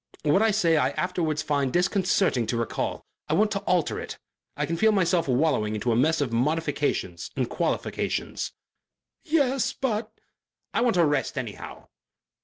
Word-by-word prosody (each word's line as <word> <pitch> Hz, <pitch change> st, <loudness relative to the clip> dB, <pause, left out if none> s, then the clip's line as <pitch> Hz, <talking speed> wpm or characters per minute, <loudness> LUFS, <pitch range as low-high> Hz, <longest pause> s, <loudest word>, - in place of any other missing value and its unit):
What 150 Hz, +6 st, +3 dB
I 225 Hz, -, +4 dB
say, 175 Hz, -6 st, +3 dB
I 130 Hz, -3 st, +3 dB
afterwards 165 Hz, -4 st, -1 dB
find 140 Hz, -3 st, 0 dB
disconcerting 180 Hz, -, +1 dB
to 120 Hz, -, -1 dB
recall. 115 Hz, -1 st, -3 dB, 0.2 s
I -, -, +2 dB
want 210 Hz, +1 st, +3 dB
to 200 Hz, -, 0 dB
alter 180 Hz, -5 st, 0 dB
it. -, -, -7 dB, 0.4 s
I -, -, 0 dB
can 165 Hz, -, -2 dB
feel 220 Hz, +6 st, +4 dB
myself 180 Hz, -5 st, +2 dB
wallowing 125 Hz, -5 st, +1 dB
into 120 Hz, +3 st, -1 dB
a -, -, +2 dB
mess 155 Hz, +6 st, +2 dB
of 130 Hz, -5 st, -1 dB
modifications 155 Hz, +8 st, -1 dB
and -, -, 0 dB
qualifications." -, -, -2 dB, 0.7 s
"Yes, 270 Hz, -5 st, +1 dB
but 225 Hz, -4 st, -2 dB, 0.3 s
" -, -, -57 dB
"I -, -, +1 dB
want 235 Hz, -6 st, +2 dB
a 170 Hz, -, +5 dB
rest 145 Hz, -2 st, 0 dB
anyhow...." 120 Hz, -6 st, -7 dB
165 Hz, 165 wpm, -26 LUFS, 135-210 Hz, 0.7 s, a